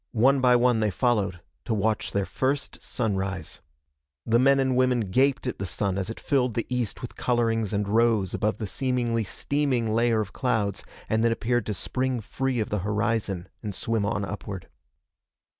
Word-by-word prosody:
One 135 +4 +5
by 125 -1 +5
one 120 -1 +3
they 110 -1 +2
followed, 100 -4 0 0.2
to 115 - 0
watch 110 +1 0
their 100 -1 0
first 135 +5 -2
sunrise. 95 - -3 0.6
The 115 +1 +3
men 135 +2 +5
and 130 -1 +2
women 125 -1 +3
gaped 135 +5 +2
at 125 - -3
the 100 - -2
sun 95 +2 -1
as 95 - -3
it 115 - -6
filled 125 -5 +1
the 115 - -1
east 125 -2 -2
with 120 - -6
colorings 115 -3 +1
and 105 -1 -1
rose 110 -3 +2
above 105 +1 0
the 110 - -3
seemingly 120 0 0
steaming 125 0 0
layer 115 0 +3
of 105 -2 -3
clouds 110 -6 0 0.2
and 110 +1 +1
then 115 - +4
appeared 120 0 0
to 105 - -1
spring 130 +2 -1
free 130 +3 -2
of 110 - -2
the 105 - 0
horizon 105 -2 -1
and 105 -4 -5
swim 115 0 0
on 105 -1 -1
upward. 100 -2 -6
115 Hz, 180 wpm, -26 LUFS, 105-125 Hz, 0.6 s, One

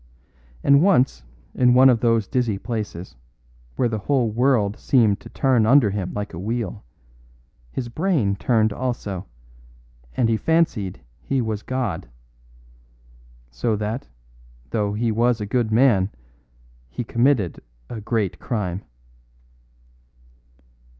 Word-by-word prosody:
And 140 0 +5
once 130 - +3 0.3
in 125 -1 +4
one 130 +1 +7
of 125 -3 +4
those 115 -3 +2
dizzy 120 -6 0
places, 105 - -5 0.6
where 125 - +1
the 110 -2 -2
whole 125 0 +1
world 115 -3 +1
seemed 110 -7 +3
to - - -12
turn 125 -5 +2
under 125 -4 +5
him 95 -3 -3
like 105 0 -4
a 85 - -6
wheel, 110 0 -3 0.9
his 125 - -4
brain 130 - 0
turned 110 -1 +1
also, 110 - -4 0.9
and 120 - +3
he 115 -1 +2
fancied 135 - 0 0.2
he 135 - -1
was 110 -3 -2
God. 115 - -3 1.4
So 105 - -1
that, 105 +4 -4 0.6
though 105 -2 0
he 115 +2 0
was 120 +1 +2
a 105 - -3
good 115 +1 0
man, 110 -5 +4 0.8
he 120 - -4
committed 115 - +1 0.3
a 110 - -7
great 105 -3 -1
crime." 100 -5 -3
115 Hz, 125 wpm, -22 LUFS, 105-125 Hz, 1.4 s, one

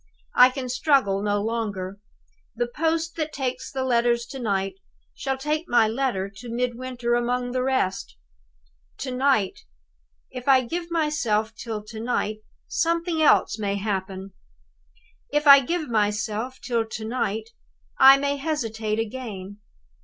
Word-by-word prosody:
I 250 +1 +8
can 255 0 -5
struggle 250 -6 +2
no 205 0 +1
longer. 205 -4 -3 0.6
The 240 +1 0
post 325 +6 -1
that 310 -1 -2
takes 265 -3 -3
the 265 -1 -2
letters 235 -1 +2
to 270 - -6
night 195 -4 -1 0.4
shall 270 -1 -3
take 305 +4 -2
my 240 -2 +5
letter 225 -4 -1
to 235 +4 -9
Midwinter 245 0 -2
among 245 +1 0
the 255 0 -1
rest. 255 -8 -1 0.8
"To 260 - -4
night! 255 -7 +2 0.7
If 250 +1 -8
I 265 -2 +6
give 335 +7 -4
myself 300 -10 0
till 220 -1 -6
to 220 +1 -9
night, 220 -2 -1 0.3
something 335 0 0
else 290 -7 +4
may 200 -1 -1
happen. 195 -1 -4 1.0
If 295 +1 +1
I 280 -1 +10
give 310 +4 -2
myself 215 +3 -1
till 235 -3 0
to 220 0 -7
night, 225 -2 -2 0.5
I 270 +1 +9
may 280 +1 -1
hesitate 225 -8 -2
again. 210 -4 -5
240 Hz, 140 wpm, -24 LUFS, 215-270 Hz, 1.0 s, I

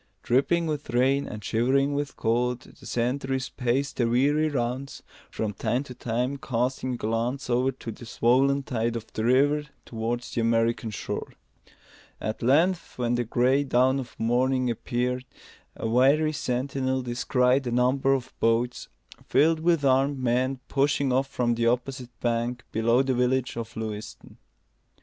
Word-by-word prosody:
Dripping 165 +7 +2
with 150 -4 -3
rain 130 +4 +2
and 105 -1 -7
shivering 135 +7 +1
with 145 0 -3
cold, 120 +2 0
the - - -15
sentries 130 +2 -1
paced 130 +2 -1
their 120 - +2
weary 145 +6 +2
rounds, 130 0 -3 0.3
from 105 -2 -3
time 125 +6 -1
to 130 - -10
time 125 +3 -2
casting 130 0 -2
a - - -6
glance 120 +4 -2
over 125 +2 +2
the 115 -3 -9
swollen 135 +5 +2
tide 115 -2 -1
of 115 -1 -4
the 110 - -2
river 145 +5 +3 0.2
towards 120 +1 -3
the 115 - -1
American 115 0 +1
shore. 105 - -5 0.9
At 110 - -4
length, 165 +9 +2
when 120 -1 0
the 120 0 +1
gray 125 +4 +2
dawn 130 0 +2
of 125 -3 -9
morning 125 +2 +1
appeared, 125 +2 -2 0.5
a - - -3
wary 140 +7 +3
sentinel 130 -1 -1
descried 125 +2 +1
a - - -1
number 130 +3 +2
of 130 - -5
boats, 115 +2 +1 0.4
filled 160 +1 +3
with 165 -3 +2
armed 135 +1 +3
men, 130 +1 0
pushing 140 -1 +1
off 135 +1 +2
from 125 -3 0
the 115 0 +1
opposite 125 0 -2
bank 120 +1 -1
below 115 +3 +3
the 135 -1 0
village 125 +1 +1
of 115 -1 -6
Lewiston. 110 -1 -7
125 Hz, 150 wpm, -26 LUFS, 120-135 Hz, 0.9 s, river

